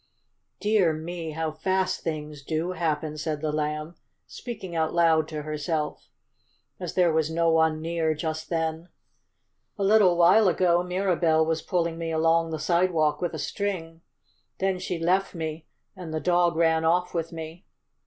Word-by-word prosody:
"Dear 205 -6 +3
me! 160 0 -5
how 160 0 -2
fast 185 +3 -1
things 150 -2 -5
do 160 +4 -2
happen," 155 -3 -2
said 155 -1 -2
the 155 0 -2
Lamb, 150 +1 -2 0.3
speaking 205 -8 -7
out 160 0 0
loud 160 -2 +4
to 155 -2 -5
herself, 150 0 -3 0.7
as 180 -3 -5
there 175 -3 +3
was 160 -1 +1
no 165 0 +2
one 160 -1 +2
near 165 -1 0
just 155 0 -4
then. 165 +1 -2 0.9
"A 200 - -1
little 195 -3 +5
while 185 +5 +6
ago 175 -1 +3
Mirabell 180 -3 +1
was 160 0 -1
pulling 170 -2 -1
me 165 -1 -3
along 165 +1 +2
the 160 - -3
sidewalk 160 -2 +1
with 175 -2 -2
a - - -4
string. 165 -1 -4 0.6
Then 190 -1 0
she 180 -1 -3
left 185 +4 +1
me 160 -1 -5 0.3
and 180 -4 -8
the 155 - -2
dog 175 0 +2
ran 160 -1 +2
off 180 +2 +1
with 165 -1 -2
me. 165 +2 -8
165 Hz, 160 wpm, -26 LUFS, 160-180 Hz, 0.9 s, while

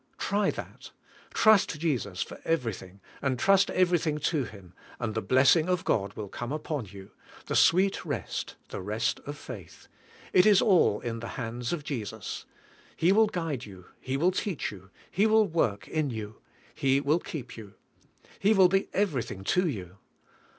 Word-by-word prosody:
Try 205 0 +1
that; - - -7 0.4
trust 215 -7 +4
Jesus 120 - -1
for - - -11
everything, 105 - -3 0.2
and 135 -2 0
trust 195 +8 +4
every 180 -2 +3
thing 155 -1 -1
to 150 -2 0
Him, 100 -5 -13 0.3
and 115 -3 -2
the 110 - -1
blessing 140 +8 +4
of 180 -2 0
God 100 -1 0
will 105 - -5
come 120 +5 -6
upon 150 -4 -3
you 95 0 -12 0.2
— - - -20
the - - -3
sweet 190 +3 +4
rest, - - -4
the - - -5
rest 105 +4 -1
of 145 0 -5
faith. 105 - -10 0.5
It 185 +3 +6
is 205 -3 +7
all 180 - +4
in 115 -1 -4
the 115 - -6
hands 120 0 -4
of 170 -4 -3
Jesus; 110 -7 -5 0.5
He 170 +3 +3
will 220 +2 +5
guide 165 - -3
you; 95 -3 -12
He 130 +1 -3
will 175 +6 +3
teach 190 -3 -2
you; 95 -2 -13 0.2
He 205 +4 +3
will 220 0 +5
work 155 - -1
in 155 -3 -1
you; 110 -3 -6 0.4
He 135 0 +2
will 145 +4 +2
keep 150 -7 -7
you; 105 -3 -11 0.6
He 215 +2 +4
will 190 -2 +6
be 195 +1 +1
everything 135 - -1
to 180 - +2
you. 95 - -5
140 Hz, 175 wpm, -28 LUFS, 110-180 Hz, 0.6 s, is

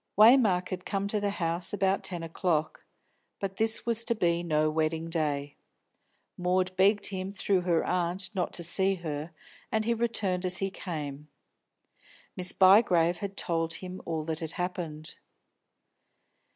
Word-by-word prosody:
Waymark 215 -5 +5
had 185 -1 -5
come 200 -1 -2
to 210 - 0
the 205 0 0
house 170 -2 -1
about 195 -1 +1
ten 175 -3 -3
o'clock. 165 -1 -2 0.5
But 195 -1 -4
this 225 0 +4
was 230 -1 +3
to 235 - +1
be 170 -4 +1
no 155 -3 +1
wedding 160 +1 -1
day. 145 -3 -2 0.8
Maud 185 +1 0
begged 200 +2 +3
him 190 -1 -4
through 195 -1 0
her 175 -2 +1
aunt 180 +2 -1
not 180 -3 -1
to 170 - -2
see 190 +3 +1
her, 155 -3 -5 0.4
and 220 0 0
he 235 - +2
returned 215 -6 -1
as 180 -1 +1
he 195 +1 -2
came. 150 -6 -6 1.1
Miss 180 0 +1
Bygrave 185 -3 +5
had 200 -1 -6
told 165 -1 -1
him 185 0 -7
all 160 -2 -3
that 160 0 -3
had 160 0 -6
happened. 170 -4 -5
180 Hz, 150 wpm, -28 LUFS, 165-195 Hz, 1.1 s, Waymark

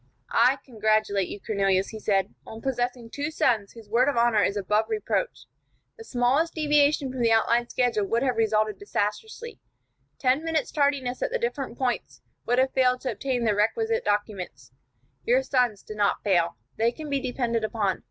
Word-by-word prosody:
"I 250 +4 +4
congratulate 215 -5 +1
you, - - -7
Cornelius," 195 -2 +1
he 220 - -8
said, 195 -1 0
"on 220 - -10
possessing 245 -2 -2
two 290 +1 -3
sons 225 -9 0
whose 225 -2 -13
word 240 +6 +3
of 280 - -2
honor 235 -3 +4
is 200 +1 +1
above 210 +2 +1
reproach. 440 +3 -2 0.5
The 455 - -11
smallest 275 - +1
deviation 295 -3 +2
from 255 -1 -4
the 230 -1 +3
outlined 235 +2 +2
schedule 230 -5 0
would 235 +4 +1
have 255 -3 +1
resulted 215 -2 +1
disastrously. 325 - -4 0.6
Ten 260 +3 +1
minutes' 320 -3 -1
tardiness 280 -4 0
at - - 0
the - - -1
different 290 - -3
points 250 -2 -3 0.2
would 245 - +2
have 260 +1 +2
failed 255 -1 +2
to 260 - -2
obtain 255 -3 -2
the 220 -2 +2
requisite 450 - 0
documents. 190 - -3 0.5
Your 255 +3 +3
sons 250 -6 0
did 215 - -9
not 205 -1 +1
fail. 175 - +1 0.2
They 230 +1 +2
can 305 +5 -8
be 280 -1 0
depended 245 -3 -1
upon. 215 -3 -1
240 Hz, 175 wpm, -26 LUFS, 215-270 Hz, 0.6 s, I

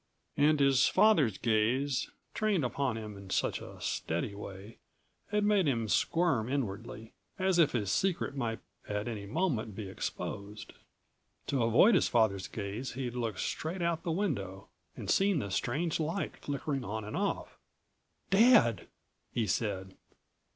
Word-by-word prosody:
And 150 +1 +4
his 135 -1 +5
father's 160 - +4
gaze, 120 - +1 0.2
trained 210 - +1
upon 125 -1 -1
him 105 -2 -7
in 100 -1 -11
such - - 0
a - - -10
steady 85 +5 -2
way, 100 +1 -9 0.5
had 210 0 +1
made 205 -5 +3
him 115 -5 0
squirm 135 -3 +1
inwardly, 115 -3 -4 0.2
as 190 -2 +2
if 150 -3 +4
his 105 -6 0
secret 185 - 0
might 115 -4 -2 0.3
at 105 +1 -2
any 105 -4 -5
moment 120 - -1
be 100 -1 -5
exposed. 100 +2 -6 0.7
To 135 -3 0
avoid 115 - +5
his - - +4
father's 105 -5 +2
gaze 105 +5 -5
he'd 125 -1 -4
looked 115 -5 -3
straight 170 +3 -3
out 170 -1 0
the 170 - -2
window 100 - -2 0.3
and - - -6
seen 195 -2 +3
the 100 -9 -3
strange 150 - -1
light 165 +5 -2
flickering 140 -1 -3
on 110 -1 -4
and 105 - -6
off. - - -2 0.7
"Dad!" 210 - +5 0.4
he 115 - 0
said. 95 -2 -2
120 Hz, 145 wpm, -31 LUFS, 105-160 Hz, 0.7 s, his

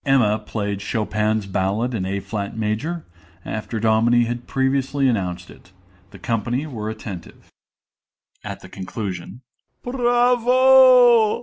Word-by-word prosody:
(Emma 120 -7 +2
played 105 -2 -4
Chopin's 105 0 -1
Ballad 100 +6 -1
in 95 -5 -2
A 100 +1 -2
flat 100 +1 -5
major, 110 +11 -3 0.4
after 110 +1 -4
Dominie 115 +2 +3
had 120 +1 -5
previously 135 +1 0
announced 90 -6 -2
it. 90 - -18 0.4
The 100 - -13
company 115 - -2
were 110 -8 -5
attentive.) 100 -5 -8
MR. - - -25 1.0
FORTE - - -6
(at - - -9
the - - -13
conclusion). 95 +2 -7 0.4
Bravo! 245 -1 +5
115 Hz, 125 wpm, -21 LUFS, 105-145 Hz, 1.0 s, Bravo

